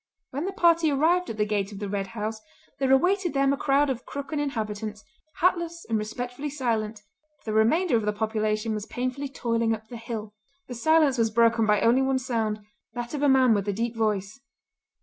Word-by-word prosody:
When 280 +6 -3
the 390 - -2
party 335 -3 +4
arrived 330 +6 +2
at 220 - -5
the 210 - +2
gate 205 -1 -1
of 200 - -8
the 205 0 -4
Red 195 0 -2
House 215 +1 -3 0.4
there 265 -1 +1
awaited 355 +4 +2
them 275 0 +3
a - - +1
crowd 280 +1 +2
of 255 -3 -3
Crooken 280 +1 -5
inhabitants, 215 -6 -3 0.4
hatless 340 -1 +1
and 225 - -1
respectfully 245 +6 -5
silent; 225 -6 -2 0.4
the 215 - -2
remainder 240 +9 +3
of 220 - -2
the - - +3
population 215 +1 -1
was 210 0 -4
painfully 255 +3 -3
toiling 230 -3 0
up 220 0 -14
the 240 - -7
hill. 220 -2 -6 0.3
The 250 - -6
silence 290 +1 +3
was 225 -1 +3
broken 230 0 +3
by 210 -1 +3
only 240 +3 +4
one 265 0 +1
sound, 225 -5 -2 0.3
that 240 +1 -5
of 290 - -3
a 290 - +4
man 260 -3 +5
with 200 -1 -1
a 205 - 0
deep 230 +3 -2
voice. 215 0 -1
235 Hz, 200 wpm, -26 LUFS, 215-275 Hz, 0.4 s, man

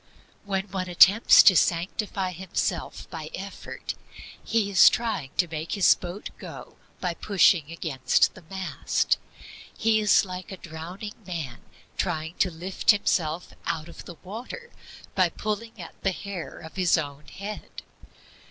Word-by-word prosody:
When 195 -1 -1
one 185 -1 -2
attempts 195 +5 +8
to 190 - +8
sanctify 185 +3 0
himself 185 +1 -3
by - - -6
effort, - - -6 0.5
he 220 -3 0
is 185 - +8
trying 220 - -2
to 175 - +3
make 160 0 -4
his 200 -4 +6
boat 180 +3 -7
go - - -10 0.2
by 180 -2 -1
pushing 175 -4 +3
against 155 -6 +1
the 185 - -13
mast. 190 -1 0 0.6
He 220 -1 +3
is 210 0 +4
like 185 +2 -7
a 190 - -6
drowning 175 +6 -8
man 160 -10 -5 0.4
trying 160 -2 -2
to 185 - +3
lift 180 +3 -5
himself 175 -5 +2
out 155 0 -2
of - - -11
the 175 - -9
water 245 - -8 0.4
by 185 -2 +3
pulling 215 +4 -4
at 170 - -8
the 190 - +1
hair 195 -2 -6
of 160 +4 -11
his 180 -2 +4
own 145 -1 -5
head. 205 +2 -8
185 Hz, 145 wpm, -26 LUFS, 165-200 Hz, 0.6 s, attempts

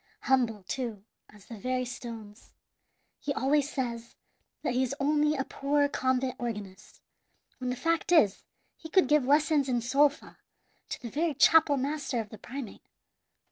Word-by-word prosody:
"Humble, 235 -6 +1
too, 225 -1 -4 0.3
as 210 -2 -17
the 225 -3 -10
very 255 +2 -1
stones. 230 -3 -9 0.7
He 285 - -3
always 285 +2 +1
says 235 -3 -4 0.5
that 245 - 0
he 250 - +1
is 260 +1 -1
only 300 +1 +2
a 270 - -1
poor 285 +2 0
convent 260 -2 -1
organist, 210 -5 -7 0.6
when 255 -1 -3
the 250 - -1
fact 330 +7 -1
is 215 - +4 0.3
he 320 - -10
could 370 -2 +4
give 300 -1 +3
lessons 290 0 +3
in 245 -1 +1
sol 275 +5 +4
fa 285 - -16 0.5
to - - -5
the 235 - -6
very 315 0 0
chapel 305 0 +5
master 275 -2 -2
of 215 -2 -5
the 215 - -11
primate. 255 0 -8
260 Hz, 160 wpm, -29 LUFS, 235-290 Hz, 0.7 s, chapel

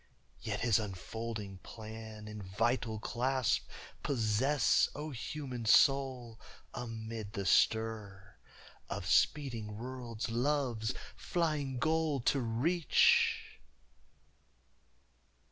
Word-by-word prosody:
Yet - - -3
His 115 -2 +4
unfolding 105 0 -5
plan 110 +1 -9
in 105 -1 -7
vital 115 +4 0
clasp 125 +3 0 0.3
Possess, 130 +3 +2
O 150 +1 -5
human 130 -1 -5
soul, 130 -1 +3 0.3
amid 110 -3 -6
the 100 - -3
stir 105 -4 +1 0.5
Of - - -4
speeding 115 -8 +1
worlds 120 -2 -5
Love's 120 -3 0 0.2
flying 150 -6 -1
goal 155 +1 +1
to 135 +3 +2
reach! 135 +9 +2
115 Hz, 85 wpm, -33 LUFS, 110-135 Hz, 0.5 s, His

